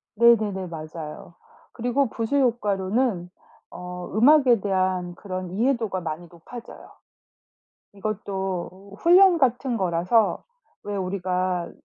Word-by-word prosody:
네네네. 215 -5 +3
맞아요. 155 0 -8 0.4
그리고 245 +3 0
부수 230 +5 -3
효과로는 210 -5 0 0.4
어 180 0 -8
음악에 250 0 +5
대한 185 -3 -1
그런 185 -2 -6
이해도가 225 -3 0
많이 165 +1 -5
높아져요. 225 +8 -12 1.0
이것도 195 -1 -5
훈련 360 0 +6
같은 250 -1 +1
거라서 180 +5 +1 0.4
왜 205 - -5
우리가 185 -1 -2
195 Hz, 240 characters per minute, -24 LUFS, 180-235 Hz, 1.0 s, 훈련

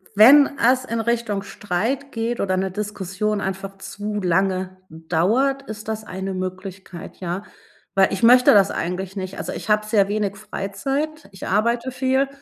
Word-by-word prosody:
Wenn 275 +8 +8
es 255 +2 +3
in 230 -2 -2
Richtung 230 -3 -1
Streit 215 +8 -3
geht 230 0 -2
oder 185 -1 0
'ne 190 0 -1
Diskussion 205 +1 -3
einfach 195 0 -5
zu 205 +2 -5
lange 185 +1 0
dauert, 190 +13 0
ist 215 -4 -8
das 220 0 -3
eine 190 0 -5
Möglichkeit, 185 -1 -7
ja. 180 +2 -4 0.5
Weil 195 -1 +4
ich 195 - -3
möchte 250 +2 +7
das 200 -2 +5
eigentlich 185 +2 -3
nicht, 190 -1 -5
also - - -4
ich - - -7
habe 210 0 +3
sehr 210 -2 +3
wenig 205 -1 -1
Freizeit, 270 +10 -4
ich 190 - -8
arbeite 235 +5 +1
viel 260 +1 +1
205 Hz, 160 wpm, -22 LUFS, 190-235 Hz, 0.5 s, Wenn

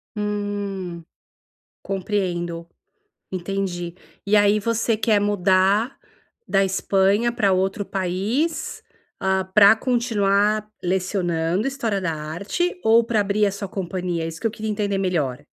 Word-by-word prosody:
Hum, 205 -4 -3 0.8
compreendo, 175 -4 -2 0.6
entendi. 180 -2 -3 0.3
E 200 +1 +3
aí 205 0 +4
você 230 +1 0
quer 215 -1 +3
mudar 200 +3 +2 0.5
da 195 0 +3
Espanha 195 +4 +2
pra 200 -5 +2
outro 195 +2 0
país, 200 - -2 0.4
hã, 190 0 +1
para 210 0 +8
continuar 215 -3 +1 0.2
lecionando 180 0 0
história 230 -7 -2
da 180 -3 -1
arte 170 - -2
ou 225 +1 +5
para 230 -1 0
abrir 205 +1 +2
a 200 - +1
sua 200 0 -5
companhia? 180 -3 -3
É - - -2
isso 165 0 -8
que - - +2
eu - - -4
queria 220 0 -4
entender 205 -1 -1
melhor. 165 -10 -1
200 Hz, 125 wpm, -22 LUFS, 185-210 Hz, 0.8 s, para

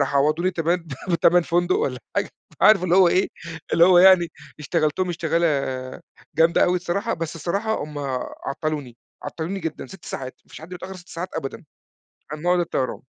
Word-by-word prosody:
راحوا 140 0 +2
عوّضوني 155 +6 +1
تبان 170 0 -1 0.2
بتَمَن 175 0 +4
فندق 175 +1 +1
والّا 125 -2 -2 0.2
حاجة - - +2 0.3
أنت - - -12
عارف 215 -4 +6
اللي 180 -1 +2
هو 185 -2 +7
إيه 185 +2 +2 0.4
اللي 170 - +6
هو 180 0 +6
يعني 180 -2 +7 0.3
اشتغلتهم 155 +3 0
اشتغالة 170 0 0 0.9
جامدة 165 +2 +4
أوي 180 0 +2
الصراحة، 185 +5 -2
بس 165 0 -5
الصراحة 200 +8 -2
هُم 150 -1 -8 0.5
عَطّلوني، 145 -3 -4 0.3
عَطّلوني 175 +4 -4
جدًا 165 -3 -5
6 190 -2 -13
ساعات، 130 -1 -6
ما - - -32
فيش - - -11
حد 160 - -11
بيتأخّر 185 +1 -8
6 175 -1 -15
ساعات 175 +3 -5
أبدًا 160 +6 -5 0.7
عن 150 0 -6
موعد 180 +1 +2
الطّيران. 135 -6 -2
170 Hz, 175 wpm, -23 LUFS, 155-180 Hz, 0.9 s, هو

